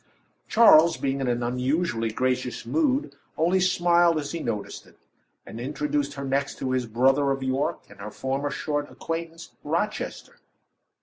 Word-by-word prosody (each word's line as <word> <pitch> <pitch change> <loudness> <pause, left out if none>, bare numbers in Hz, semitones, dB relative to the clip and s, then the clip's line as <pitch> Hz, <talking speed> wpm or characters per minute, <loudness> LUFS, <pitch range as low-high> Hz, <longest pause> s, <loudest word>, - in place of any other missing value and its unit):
Charles 170 -7 +6
being 135 0 -2
in 130 - -1
an 120 0 0
unusually 125 0 -1
gracious 125 +1 -2
mood, 295 -3 0 0.2
only 175 +4 +2
smiled 175 -2 +3
as 145 -2 -3
he 170 - -4
noticed 110 -8 -5
it, - - -21 0.5
and 115 - -9
introduced 145 +2 -2
her 140 0 -5
next 140 +1 -1
to 130 - -3
his 130 -2 -1
brother 135 +5 +2
of 135 -1 -1
York, 130 +2 -1
and - - -17
her 105 - -6
former 135 +5 -3
short 145 0 -3
acquaintance, 165 0 -6
Rochester. 170 +8 -3
140 Hz, 150 wpm, -25 LUFS, 130-165 Hz, 0.5 s, Charles